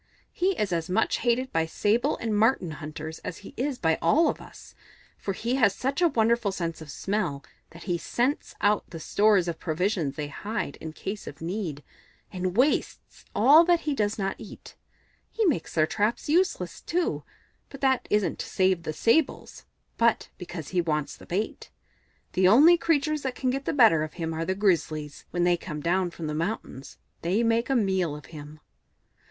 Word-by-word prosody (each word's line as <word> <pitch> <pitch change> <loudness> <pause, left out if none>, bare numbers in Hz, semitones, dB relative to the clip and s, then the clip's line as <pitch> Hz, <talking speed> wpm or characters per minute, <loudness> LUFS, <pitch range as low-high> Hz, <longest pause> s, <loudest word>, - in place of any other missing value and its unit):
He 375 +1 0
is 200 -4 0
as 165 0 -2
much 210 +5 +1
hated 245 +2 0
by 165 0 +1
Sable 225 - +1
and 225 -2 -2
Marten 210 -5 +2
hunters 155 +1 -7
as 175 - -6
he - - -10
is 265 +1 -2
by 160 -5 +1
all 310 - +4
of - - -4
us, - - -14 0.4
for 195 - -4
he 235 +6 -2
has 215 -7 +3
such 270 +6 -2
a 350 - +6
wonderful 235 -5 +2
sense 165 -3 -4
of 155 - -10
smell 145 -4 -2 0.3
that 170 +1 -13
he 175 -2 -1
scents 250 - -1
out 205 0 +2
the 165 - -8
stores 200 +2 +3
of 165 -1 -3
provisions 165 -3 -1
they 150 -1 -4
hide 205 0 -4
in 160 - -7
case 195 +6 -6
of - - -8
need, 165 -4 -4 0.5
and 185 +1 -3
wastes 275 +4 0
all 275 +10 +7
that 345 -1 +3
he 300 - -1
does 210 -5 0
not 195 -2 -1
eat. 215 - -11 0.5
He 450 - 0
makes 290 - 0
their 155 -2 +4
traps 210 +7 -1
useless, 355 +6 0
too 350 0 -1 0.5
but 275 - -11
that 265 -2 +2
isn't 210 -2 +1
to - - -4
save 185 -2 +2
the 155 -2 -4
Sables, 255 - 0 0.3
but 230 -1 +2
because 175 -5 -7
he 180 -1 +1
wants 150 -3 -2
the - - -15
bait. 200 +5 -3 0.6
The 185 0 +4
only 290 - +7
creatures 305 -2 +1
that 260 -2 -3
can 255 -1 0
get 270 +1 -3
the - - 0
better 225 - +5
of 155 0 -4
him 165 -2 -3
are 165 +1 -2
the 190 - -1
Grizzlies; 155 -7 0
when 175 0 -1
they 175 0 +3
come 155 -3 -6
down 175 +4 +1
from 170 -1 -7
the 150 - -3
mountains 155 - -4 0.2
they 190 +7 +1
make 230 +2 +1
a 270 - +2
meal 190 - +1
of 150 - -10
him." 150 0 -10
195 Hz, 190 wpm, -26 LUFS, 165-240 Hz, 0.6 s, all